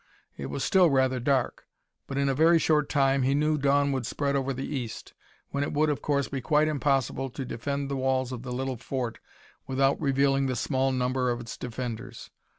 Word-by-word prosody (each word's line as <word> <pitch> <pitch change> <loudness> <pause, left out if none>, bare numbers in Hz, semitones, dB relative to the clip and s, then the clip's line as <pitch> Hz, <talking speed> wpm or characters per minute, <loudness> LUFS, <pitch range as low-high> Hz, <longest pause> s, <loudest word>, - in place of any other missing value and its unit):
It - - -6
was - - -3
still 185 -3 +5
rather 130 -2 +2
dark; 130 0 0 0.4
but 135 - -4
in 140 0 +2
a 135 - +2
very 165 +5 +5
short 150 -2 +2
time, 135 -2 +2
he 135 +2 +2
knew, 150 +1 +2
dawn 140 0 +2
would 130 -4 -2
spread 140 +1 -1
over 135 0 0
the 135 +1 -4
east, 125 -6 -5 0.4
when 140 0 -1
it - - -3
would, 150 +1 +2
of 145 - -3
course, 140 -2 0
be 135 -2 -4
quite 150 +4 +3
impossible 135 -3 0
to 130 +2 -6
defend 140 +4 -3
the 140 - -3
walls 130 -1 0
of 125 -2 -5
the 125 0 -7
little 130 0 -2
fort 125 0 -4 0.5
without 135 +1 +1
revealing 135 0 +2
the 130 - -1
small 135 +3 0
number 125 0 0
of 120 -1 -1
its 115 -2 -7
defenders. 120 -2 -6
135 Hz, 205 wpm, -27 LUFS, 130-140 Hz, 0.5 s, still